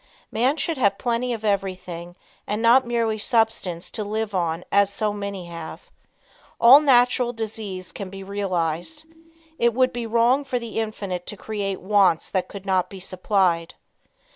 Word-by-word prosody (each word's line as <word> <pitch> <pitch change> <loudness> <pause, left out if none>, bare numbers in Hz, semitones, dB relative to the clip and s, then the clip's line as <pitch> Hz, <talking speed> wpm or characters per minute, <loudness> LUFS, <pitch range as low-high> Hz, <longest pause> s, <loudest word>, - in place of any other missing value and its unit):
Man 255 +7 +1
should 315 0 -2
have 200 -4 +3
plenty 245 +1 -1
of 225 -2 -4
everything 185 -4 -3 0.3
and 210 +1 -1
not 235 +2 +5
merely 230 -2 0
substance 210 -7 0
to 215 - -4
live 215 +1 -3
on 170 -2 -1
as 200 0 +4
so 210 0 -1
many 200 -3 -5
have. 165 -1 -9 0.7
All 245 +5 +9
natural 245 -3 +3
desires 215 -4 -6
can 195 -2 -7
be 195 0 -9
realized. 190 - -3 0.5
It 235 -1 +2
would 255 0 +3
be 240 -1 -4
wrong 235 +5 +3
for 260 -2 -2
the 230 -2 -4
Infinite 200 -5 -4
to 210 - -7
create 200 -2 -4
wants 195 -4 +2
that 185 -2 0
could 200 -1 -10
not 185 -2 +1
be 195 - -9
supplied. 185 -2 0
205 Hz, 160 wpm, -23 LUFS, 185-235 Hz, 0.7 s, All